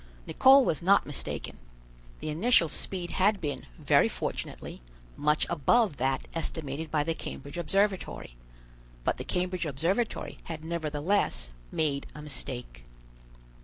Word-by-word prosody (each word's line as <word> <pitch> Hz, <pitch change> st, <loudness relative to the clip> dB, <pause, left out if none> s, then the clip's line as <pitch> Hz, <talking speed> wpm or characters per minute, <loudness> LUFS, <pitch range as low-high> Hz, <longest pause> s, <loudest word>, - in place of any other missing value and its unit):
Nicholl 265 Hz, 0 st, +6 dB
was 155 Hz, -, 0 dB
not 195 Hz, +3 st, +4 dB
mistaken. 145 Hz, -, -5 dB, 0.6 s
The -, -, -3 dB
initial 170 Hz, 0 st, +5 dB
speed 175 Hz, +2 st, -3 dB
had 200 Hz, +2 st, +3 dB
been, 145 Hz, -4 st, -4 dB
very -, -, +4 dB
fortunately, -, -, -5 dB, 0.3 s
much 150 Hz, +1 st, +2 dB
above 170 Hz, -, +2 dB
that 135 Hz, +1 st, 0 dB
estimated 160 Hz, -2 st, -3 dB
by 150 Hz, -1 st, +1 dB
the 165 Hz, +2 st, -1 dB
Cambridge 145 Hz, -2 st, -7 dB
Observatory; 195 Hz, -, 0 dB, 0.7 s
but -, -, 0 dB
the -, -, -4 dB
Cambridge 180 Hz, -2 st, -1 dB
Observatory 170 Hz, -, -1 dB
had 160 Hz, -1 st, -6 dB
nevertheless 155 Hz, -, 0 dB, 0.2 s
made 145 Hz, -3 st, -1 dB
a 150 Hz, -, -8 dB
mistake. -, -, -6 dB
160 Hz, 125 wpm, -29 LUFS, 145-185 Hz, 0.7 s, Nicholl